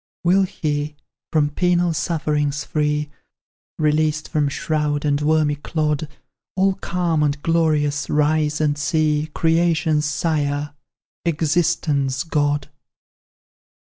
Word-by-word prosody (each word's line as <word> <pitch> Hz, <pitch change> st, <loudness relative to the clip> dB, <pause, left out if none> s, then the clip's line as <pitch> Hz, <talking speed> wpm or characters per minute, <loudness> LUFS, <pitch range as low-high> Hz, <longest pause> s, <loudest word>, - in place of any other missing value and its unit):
"Will 180 Hz, +3 st, +4 dB
he, 150 Hz, -5 st, -2 dB, 0.4 s
from 150 Hz, -2 st, +2 dB
penal 175 Hz, +1 st, +1 dB
sufferings 150 Hz, -3 st, -1 dB
free, 150 Hz, -1 st, -1 dB, 0.7 s
Released 155 Hz, 0 st, +1 dB
from 150 Hz, -2 st, +1 dB
shroud 150 Hz, 0 st, -1 dB
and 145 Hz, 0 st, +1 dB
wormy 155 Hz, 0 st, +2 dB
clod, 150 Hz, 0 st, -1 dB, 0.5 s
All 195 Hz, +1 st, +3 dB
calm 175 Hz, -4 st, -1 dB
and 145 Hz, 0 st, +1 dB
glorious, 150 Hz, -4 st, +1 dB
rise 150 Hz, 0 st, +1 dB
and 150 Hz, -1 st, +1 dB
see 155 Hz, 0 st, +1 dB
Creation's 160 Hz, -2 st, +2 dB
Sire 145 Hz, -1 st, -1 dB, 0.5 s
Existence' 150 Hz, -4 st, 0 dB
God? 145 Hz, -3 st, 0 dB
150 Hz, 100 wpm, -21 LUFS, 145-160 Hz, 0.7 s, Will